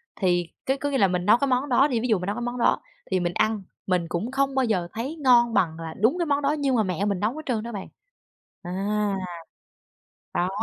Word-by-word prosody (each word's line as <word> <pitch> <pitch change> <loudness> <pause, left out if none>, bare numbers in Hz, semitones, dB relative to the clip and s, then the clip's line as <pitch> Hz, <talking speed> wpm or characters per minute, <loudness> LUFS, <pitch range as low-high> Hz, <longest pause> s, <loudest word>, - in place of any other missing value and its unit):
thì 175 -3 +1 0.2
cứ 270 +1 +1
có 285 +1 -2
nghĩa 275 - 0
là 200 - +5
mình 180 -1 -1
nấu 215 +4 +6
cái 280 - 0
món 260 +2 +1
đó 270 +3 +5
đi, 245 -5 0
ví 245 - -1
dụ 220 -5 +2
mình 180 - -5
nấu 205 - -1
cái 240 - -4
món 240 +1 -3
đó 235 - +2 0.3
thì 185 - +2
mình 175 0 -1
ăn, 215 0 +1 0.2
mình 180 -2 +1
cũng 210 +9 -2
không 275 0 0
bao 265 -1 +3
giờ 185 -7 0
thấy 255 +8 -4
ngon 245 -6 +4
bằng 165 -5 +1
là 165 -1 -6
đúng 230 - +3
cái 345 - +1
món 285 -2 +1
đó 280 0 +2
nhưng 275 -2 +1
mà 220 - +3
mẹ 185 0 -1
mình 200 -3 0
nấu 210 +4 +1
hết 310 - -5
trơn 230 -5 -1
đó 235 - -6
bạn. 200 -4 -6 0.8
À. 200 +3 -1 1.2
Đó. 175 +1 +1
220 Hz, 255 wpm, -25 LUFS, 185-260 Hz, 1.2 s, nấu